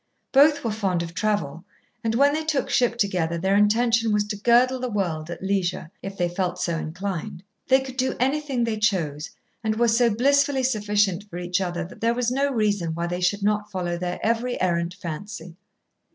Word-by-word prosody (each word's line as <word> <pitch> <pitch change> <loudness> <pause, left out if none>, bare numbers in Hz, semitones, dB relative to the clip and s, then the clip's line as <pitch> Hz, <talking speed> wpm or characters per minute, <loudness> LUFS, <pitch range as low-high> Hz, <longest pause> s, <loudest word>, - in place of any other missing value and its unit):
Both 290 +1 +5
were 230 - -1
fond 190 -5 -1
of 170 0 -7
travel, 170 -6 -1 0.4
and 225 0 0
when 280 +3 +4
they 315 +1 -1
took 310 -3 -1
ship 240 -1 +2
together 180 -6 0
their 190 +3 +1
intention 225 +2 +3
was 210 0 +2
to 210 - -2
girdle 240 +4 +3
the 250 0 -3
world 170 -7 -2
at 175 - -7
leisure, 185 -4 -1
if 195 0 -7
they 175 - +1
felt 180 0 -2
so 170 -2 -1
inclined. 180 +1 -5 0.2
They 265 0 +5
could 260 -1 -8
do 260 0 0
anything 270 -1 0
they 225 -2 -1
chose, 165 -8 0 0.3
and 215 -1 0
were 235 +1 +2
so 235 +1 +4
blissfully 275 +4 +2
sufficient 210 -4 0
for 175 - -7
each 180 +2 -1
other 175 -1 -2
that 180 - -13
there 230 +1 +2
was 245 -1 0
no 275 +2 +1
reason 205 -9 0
why 170 +1 -2
they 175 +1 -3
should 200 +3 +1
not 210 0 0
follow 175 -3 -2
their 175 +1 -4
every 235 +2 0
errant 170 -1 0
fancy. 175 -1 -7
205 Hz, 195 wpm, -24 LUFS, 175-240 Hz, 0.4 s, Both